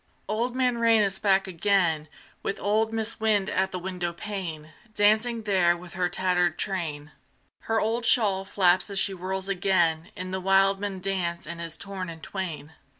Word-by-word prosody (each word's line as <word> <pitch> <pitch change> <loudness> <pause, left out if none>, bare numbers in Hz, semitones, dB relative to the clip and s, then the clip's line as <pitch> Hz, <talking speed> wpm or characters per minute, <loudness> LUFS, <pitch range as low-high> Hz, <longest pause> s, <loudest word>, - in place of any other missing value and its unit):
Old 235 +4 -1
Man 250 -2 +1
Rain 230 -1 +4
is 195 -1 0
back 195 -1 +3
again, 175 -4 +1 0.3
With 195 - -3
old 220 +2 +1
Mis' 225 0 0
Wind 210 -3 +1
at 190 +1 +1
the 185 - -3
windowpane, 175 -2 -5 0.2
Dancing 220 +3 +3
there 180 -4 +3
with 175 0 -12
her 180 0 0
tattered 180 -1 +1
train: 160 -6 -3 0.5
Her 225 0 +1
old 225 +3 -1
shawl 205 -5 +3
flaps 185 -1 +2
as 200 - -4
she 195 - +3
whirls 190 +1 -3
again 175 -4 +1
In 185 0 -6
the 190 0 -3
wildman 195 0 +2
dance 180 -3 -2
and 170 +2 -7
is 165 -1 -1
torn 195 -2 -6
in 165 -1 -8
twain. 160 -6 -6
190 Hz, 165 wpm, -26 LUFS, 175-205 Hz, 0.5 s, Rain